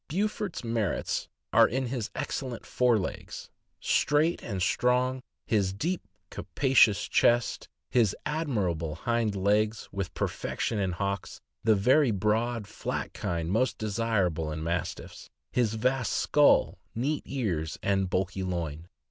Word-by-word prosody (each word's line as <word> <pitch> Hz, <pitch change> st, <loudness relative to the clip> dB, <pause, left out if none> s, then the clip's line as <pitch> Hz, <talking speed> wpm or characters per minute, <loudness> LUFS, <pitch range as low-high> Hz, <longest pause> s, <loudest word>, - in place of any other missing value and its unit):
Beaufort's 205 Hz, 0 st, -2 dB
merits 115 Hz, -4 st, -1 dB, 0.3 s
are -, -, +7 dB
in 130 Hz, +4 st, -1 dB
his 120 Hz, -3 st, -3 dB
excellent 130 Hz, -4 st, -4 dB
fore 125 Hz, -2 st, +3 dB
legs, 95 Hz, -, -6 dB, 0.3 s
straight 155 Hz, +4 st, +2 dB
and 100 Hz, -5 st, -4 dB
strong, 125 Hz, +6 st, +1 dB, 0.2 s
his 100 Hz, -4 st, +1 dB
deep, 170 Hz, -, -2 dB, 0.3 s
capacious 105 Hz, -, +3 dB
chest, 120 Hz, -1 st, +2 dB, 0.2 s
his 115 Hz, -6 st, +3 dB
admirable 100 Hz, -, -1 dB
hind 115 Hz, +3 st, 0 dB
legs, 105 Hz, +3 st, +1 dB
with 100 Hz, -3 st, -3 dB
perfection 110 Hz, -, -2 dB
in 95 Hz, -2 st, 0 dB
hocks, 100 Hz, +1 st, -3 dB, 0.2 s
the 110 Hz, -1 st, +5 dB
very 130 Hz, +7 st, +4 dB
broad, 110 Hz, +2 st, 0 dB
flat 105 Hz, -, -4 dB
kind 85 Hz, 0 st, -2 dB
most 120 Hz, +6 st, +1 dB
desirable 100 Hz, -8 st, 0 dB
in 80 Hz, +1 st, -4 dB
Mas 85 Hz, +1 st, -1 dB
tiffs, -, -, -12 dB, 0.2 s
his 115 Hz, -3 st, +1 dB
vast 125 Hz, +2 st, 0 dB
skull, 150 Hz, -1 st, +4 dB, 0.2 s
neat 140 Hz, +6 st, -1 dB
ears, 90 Hz, -, -2 dB
and 95 Hz, -2 st, +1 dB
bulky 95 Hz, +1 st, -1 dB
loin. 85 Hz, -3 st, -3 dB
110 Hz, 130 wpm, -28 LUFS, 95-125 Hz, 0.3 s, are